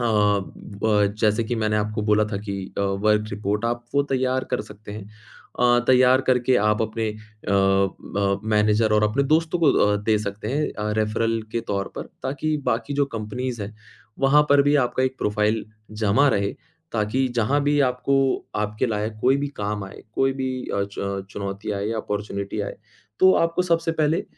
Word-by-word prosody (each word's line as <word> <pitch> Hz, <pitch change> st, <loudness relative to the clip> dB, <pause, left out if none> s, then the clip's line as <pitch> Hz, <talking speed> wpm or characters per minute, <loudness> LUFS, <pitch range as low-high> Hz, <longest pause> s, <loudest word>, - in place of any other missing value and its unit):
अ, -, -, -1 dB
ब 105 Hz, -1 st, +1 dB
जैसे 110 Hz, +1 st, +3 dB
कि 120 Hz, -, -2 dB
मैंने 110 Hz, -1 st, 0 dB
आपको 105 Hz, +1 st, -1 dB
बोला 105 Hz, 0 st, +3 dB
था 100 Hz, -, 0 dB
कि 100 Hz, -, -3 dB, 0.2 s
अ, -, -, +1 dB
वर्क 105 Hz, +2 st, +1 dB
रिपोर्ट 105 Hz, +2 st, -2 dB
आप 120 Hz, 0 st, -2 dB
वो 140 Hz, -, +4 dB
तैयार 130 Hz, 0 st, +1 dB
कर 125 Hz, -, 0 dB
सकते 105 Hz, -1 st, -11 dB
हैं। 105 Hz, -1 st, -7 dB, 0.6 s
अ, 120 Hz, 0 st, +5 dB
तैयार 130 Hz, 0 st, +6 dB
करके 125 Hz, 0 st, +3 dB
आप 105 Hz, 0 st, +2 dB
अपने 110 Hz, 0 st, -2 dB
अ 110 Hz, 0 st, -10 dB
अ, 100 Hz, 0 st, +1 dB
मैनेजर 105 Hz, 0 st, +2 dB
और 105 Hz, -, +3 dB
अपने 115 Hz, +7 st, +1 dB
दोस्तों 165 Hz, +2 st, +2 dB
को 155 Hz, -, +5 dB
अ, 105 Hz, 0 st, +3 dB
दे 105 Hz, +1 st, +1 dB
सकते 105 Hz, +1 st, -5 dB
हैं 150 Hz, +4 st, 0 dB
अ, 105 Hz, 0 st, -3 dB
रेफ़रल 115 Hz, +1 st, 0 dB
के 115 Hz, -, 0 dB
तौर 100 Hz, -1 st, -1 dB
पर -, -, -3 dB, 0.2 s
ताकि 145 Hz, +3 st, -1 dB
बाकी 115 Hz, +5 st, -1 dB
जो 140 Hz, 0 st, +2 dB
कंपनीज़ 115 Hz, +1 st, -4 dB
हैं, 105 Hz, +2 st, -7 dB, 0.5 s
वहाँ 140 Hz, +2 st, +5 dB
पर 140 Hz, 0 st, +6 dB
भी 145 Hz, +1 st, +2 dB
आपका 130 Hz, -, -2 dB
एक 130 Hz, 0 st, 0 dB
प्रोफ़ाइल 105 Hz, +1 st, 0 dB, 0.4 s
जमा 110 Hz, +8 st, +4 dB
रहे। 100 Hz, 0 st, -1 dB, 0.4 s
ताकि 115 Hz, +4 st, 0 dB
जहाँ 135 Hz, +6 st, +2 dB
भी 145 Hz, +1 st, +2 dB
आपको 125 Hz, +2 st, 0 dB, 0.5 s
आपके 105 Hz, +3 st, -2 dB
लायक 110 Hz, 0 st, -2 dB
कोई 130 Hz, +2 st, +4 dB
भी 145 Hz, 0 st, -2 dB
काम 105 Hz, 0 st, -3 dB
आए, 95 Hz, -, -11 dB
कोई 135 Hz, 0 st, +2 dB
भी 130 Hz, -1 st, -3 dB, 0.2 s
अ, 100 Hz, -, +1 dB, 0.2 s
च 100 Hz, -1 st, -3 dB
चुनौती 100 Hz, +1 st, -5 dB
आए 100 Hz, +1 st, -2 dB
या 115 Hz, -, -2 dB
अपॉर्च्युनिटी 100 Hz, -1 st, -4 dB
आए, -, -, -5 dB, 0.4 s
तो 185 Hz, 0 st, +7 dB
आपको 165 Hz, +2 st, -1 dB
सबसे 165 Hz, -2 st, +1 dB
पहले 155 Hz, +1 st, +1 dB
110 Hz, 185 wpm, -23 LUFS, 105-130 Hz, 0.6 s, तो